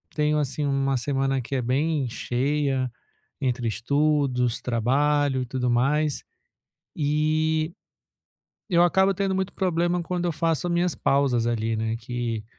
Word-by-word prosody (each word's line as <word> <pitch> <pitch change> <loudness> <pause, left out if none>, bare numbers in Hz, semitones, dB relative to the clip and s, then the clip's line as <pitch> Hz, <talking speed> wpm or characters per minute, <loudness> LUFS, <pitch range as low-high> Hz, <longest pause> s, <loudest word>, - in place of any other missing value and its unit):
tenho, 150 0 +2
assim, 145 +1 -2
uma 135 -1 +1
semana 135 +1 0
que 135 +3 -5
é 130 - 0
bem 135 +2 0
cheia 135 +1 -1 0.5
entre 125 -3 -1
estudos, 130 0 +1
trabalho 135 +3 +1
e - - -2
tudo 125 0 -2
mais, 140 +5 +1 0.7
e 155 +1 +1 1.0
eu 175 -3 +4
acabo 190 +2 +4
tendo 195 0 0
muito 190 0 -2
problema 175 -1 0
quando 175 +1 -3
eu 175 - 0
faço 165 +2 0
a - - -1
minhas 175 0 +1
pausas 135 -4 +1
ali, 115 -1 0
né, 110 +1 -1
que 115 -2 -4
140 Hz, 140 wpm, -25 LUFS, 125-155 Hz, 1.0 s, eu